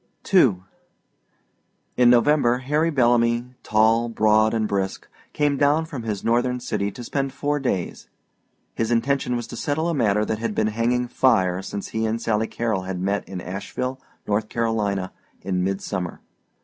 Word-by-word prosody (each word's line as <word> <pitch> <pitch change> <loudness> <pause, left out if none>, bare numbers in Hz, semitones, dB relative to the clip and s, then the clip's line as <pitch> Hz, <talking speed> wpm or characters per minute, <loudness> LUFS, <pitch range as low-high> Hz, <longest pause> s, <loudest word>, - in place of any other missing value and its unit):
II 110 - +5 1.3
In 125 -1 +5
November 125 0 +4
Harry 150 +5 0
Bellamy, 120 -3 +2
tall, 110 +2 +2
broad, 110 -1 +3
and 110 -2 0
brisk, 95 -2 -2 0.2
came 145 -1 +1
down 145 +3 +3
from 145 -6 -6
his 105 -3 -4
Northern 120 +2 +1
city 100 -4 -2
to 125 - -8
spend 135 +2 -2
four 145 +2 -1
days. 100 -10 -3 0.6
His 115 - -1
intention 125 +2 +1
was 120 -1 -3
to 120 - -9
settle 150 +7 -1
a - - 0
matter 105 -6 +2
that 110 0 -2
had 115 -2 -3
been 110 0 +1
hanging 120 +2 0
fire 95 -8 +2
since 100 +1 -6
he 110 0 -1
and 110 +1 -1
Sally 110 -1 0
Carrol 115 -5 -2
had 95 -1 -5
met 100 +2 -2
in 95 -2 -5
Asheville, 125 +8 -5 0.2
North 105 +1 -1
Carolina, 105 -5 -1 0.3
in 90 -1 -1
midsummer. 95 -2 -3
115 Hz, 160 wpm, -23 LUFS, 105-125 Hz, 1.3 s, II